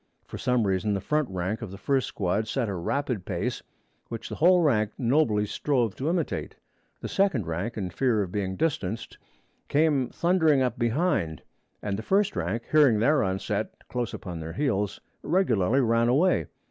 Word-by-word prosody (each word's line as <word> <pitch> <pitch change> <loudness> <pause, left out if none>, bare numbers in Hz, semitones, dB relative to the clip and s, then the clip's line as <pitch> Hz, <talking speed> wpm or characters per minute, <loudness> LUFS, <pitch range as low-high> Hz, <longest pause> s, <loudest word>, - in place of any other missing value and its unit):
For - - -8
some 125 -3 +1
reason 100 +2 0
the - - -1
front 150 +7 0
rank 95 +4 -3
of 115 - -5
the 95 - -9
first 135 +5 0
squad 100 +3 -1
set 120 +1 -1
a 100 - -2
rapid 120 +4 -2
pace, - - -3 0.5
which 115 -1 -6
the - - -6
whole 180 +2 +5
rank 110 -8 +2
nobly 120 -5 +2
strove 120 -2 0
to 140 +4 -1
imitate. 170 -2 -2 0.5
The - - -4
second 190 - +1
rank, 90 +9 -3
in 95 -4 -3
fear 115 +1 +1
of 90 - -7
being 95 -2 -2
distanced, 115 - -2 0.5
came 145 -4 +2
thundering 160 -6 +3
up 120 -2 -2
behind, 115 - 0 0.4
and 100 -1 -2
the - - -3
first 195 - +1
rank, 95 +7 -2
hearing 145 -8 +5
their 145 +7 +3
onset 95 0 -2 0.2
close 125 -2 -2
upon 90 -4 -6
their 80 0 -6
heels, 105 -8 -1 0.2
regularly 130 - +2
ran 115 -1 +2
away. 150 +10 +3
115 Hz, 170 wpm, -27 LUFS, 100-145 Hz, 0.5 s, whole